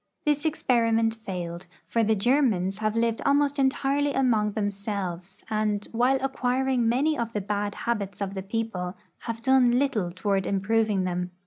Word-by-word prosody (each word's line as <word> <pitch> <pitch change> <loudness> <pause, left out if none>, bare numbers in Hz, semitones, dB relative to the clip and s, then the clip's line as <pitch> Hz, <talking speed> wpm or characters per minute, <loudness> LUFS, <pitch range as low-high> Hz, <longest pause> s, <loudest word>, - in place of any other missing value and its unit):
This 295 0 +1
experi 240 -7 +1
ment 225 0 +2
failed, 180 -6 -6 0.2
for 230 - 0
the 220 0 +2
Germans 210 -5 +1
have 215 0 -1
lived 230 0 +1
almost 285 0 +2
entirely 275 +1 +1
among 220 -6 +2
themselves, 200 -3 -4
and, 215 -2 -1
while 245 +3 +3
acquiring 260 -2 +1
many 285 +6 +2
of 235 -3 -3
the 210 - -1
bad 205 +1 -2
habits 205 -4 -3
of 200 -1 -3
the 190 - -4
people, 195 -3 -3 0.2
have 230 -1 -5
done 250 -1 +4
little 245 -10 0
toward 195 +1 -1
improving 205 0 +1
them. 180 0 -2
225 Hz, 155 wpm, -26 LUFS, 200-255 Hz, 0.2 s, done